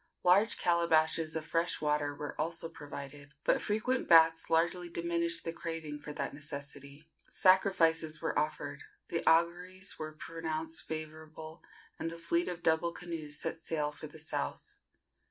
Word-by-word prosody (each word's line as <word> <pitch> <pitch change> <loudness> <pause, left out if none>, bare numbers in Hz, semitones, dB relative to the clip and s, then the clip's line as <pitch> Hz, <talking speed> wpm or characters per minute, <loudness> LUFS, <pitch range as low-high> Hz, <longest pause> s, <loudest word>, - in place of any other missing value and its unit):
Large 195 +5 +5
calabashes 165 -2 +2
of 160 -1 -3
fresh 165 +1 0
water 150 -1 0
were 145 0 -5
also 165 +1 -1
provided, 145 -2 -9
but - - +3
frequent 220 +5 0
baths 165 -1 +6
largely 170 +2 +2
diminished 170 0 0
the 165 - -3
craving 165 -3 -5
for 150 - -7
that - - -3
necessity. 140 +1 -7 0.2
Sacrifices 165 -4 +3
were - - -2
offered, 150 +1 -2 0.3
the - - -1
auguries 180 +3 +1
were 155 0 -5
pronounced 160 0 -3
favorable, 155 +1 -7 0.4
and 165 - -2
the 165 - -7
fleet 170 +1 0
of 175 -1 -4
double 160 +1 +3
canoes 160 -4 -3
set 165 - -3
sail 150 -3 -1
for 150 +1 -9
the 150 - -12
south. 155 0 -4
165 Hz, 145 wpm, -32 LUFS, 155-170 Hz, 0.4 s, baths